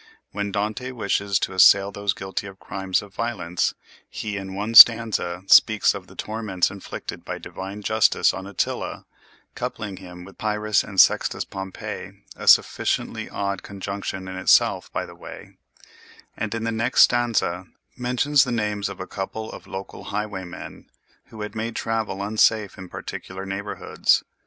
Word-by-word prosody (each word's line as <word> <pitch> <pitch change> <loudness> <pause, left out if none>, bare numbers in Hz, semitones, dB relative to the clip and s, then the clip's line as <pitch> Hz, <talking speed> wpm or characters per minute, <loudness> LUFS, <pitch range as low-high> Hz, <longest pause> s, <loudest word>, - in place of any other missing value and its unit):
When 100 0 -3
Dante 105 +5 -2
wishes 100 -4 0
to - - -2
assail 100 +1 +6
those 100 -1 -1
guilty 95 +1 -5
of 95 -1 -11
crimes 95 0 -2
of 100 -1 -14
violence, 90 -7 -2 0.3
he 105 -1 -5
in 95 -1 -6
one 105 +3 -3
stanza 110 -6 +7
speaks 110 +2 +6
of - - -8
the - - -16
torments 105 -5 -1
inflicted 100 -1 -8
by - - -5
divine 100 +2 -8
justice 110 +1 +3
on 95 0 -7
Attila 100 - -3 0.5
(coupling 105 -3 -5
him 90 -1 -11
with 95 - -15
Pyrrhus 105 -1 +1
and 100 -3 -4
Sextus - - +4
Pompey—a 95 -1 -8
sufficiently - - +3
odd 100 -1 -3
conjunction 100 -1 -6
in 95 0 -6
itself, 95 - +3
by - - -2
the - - -12
way), - - -12 0.8
and 110 +1 -3
in 115 - -3
the 115 - -1
next 115 +3 +2
stanza 110 -7 +1 0.3
mentions 125 +3 +2
the 125 - -3
names 105 -3 -1
of 100 - -9
a 95 - -4
couple 110 +4 -5
of - - -11
local 95 0 -8
highwaymen 100 -4 -6 0.4
who 110 - -11
had 105 - -5
made 115 +1 -4
travel 110 -3 -2
unsafe 110 0 +2
in 95 -1 -10
particular 95 +2 -7
neighborhoods. 100 +1 0
100 Hz, 150 wpm, -23 LUFS, 95-110 Hz, 0.8 s, stanza